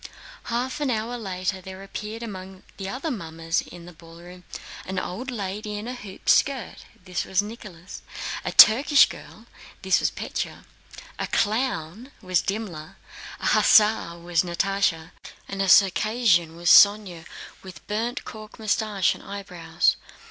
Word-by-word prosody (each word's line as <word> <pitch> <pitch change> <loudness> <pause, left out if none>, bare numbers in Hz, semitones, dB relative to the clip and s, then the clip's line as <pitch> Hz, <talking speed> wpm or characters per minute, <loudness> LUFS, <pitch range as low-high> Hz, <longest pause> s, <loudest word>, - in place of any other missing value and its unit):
Half 250 +5 -3
an 290 - 0
hour 230 +1 -2
later 190 -3 -4
there 190 +1 -10
appeared 215 +3 -7
among 190 -3 -9
the 195 -1 -5
other 275 +7 -4
mummers 165 -6 -3
in 175 -1 -12
the 175 - -12
ballroom 170 +2 -14 0.4
an 190 0 -6
old 210 +8 -4
lady 210 -2 -5
in 210 +3 -6
a 250 - -4
hooped 200 -6 -11
skirt—this 200 -8 0
was 190 +1 0
Nicholas. 205 -5 -10 0.4
A - - -3
Turkish 280 +6 +7
girl - - -12 0.4
was - - +2
Pétya. - - -5 0.5
A - - -2
clown 220 - -1
was 185 -3 0
Dimmler. 195 -7 -5 0.5
An - - +1
hussar 210 -5 +4
was 170 -1 0
Natásha, 180 -2 -1 0.4
and 195 0 -4
a 195 - 0
Circassian 195 -3 +3
was 175 +1 +2
Sónya 200 -5 +5 0.3
with 185 -4 -12
burnt 225 +4 -3
cork 215 -2 -10
mustache 215 -3 0
and - - -13
eyebrows. 180 -5 -1
195 Hz, 135 wpm, -24 LUFS, 175-220 Hz, 0.5 s, Turkish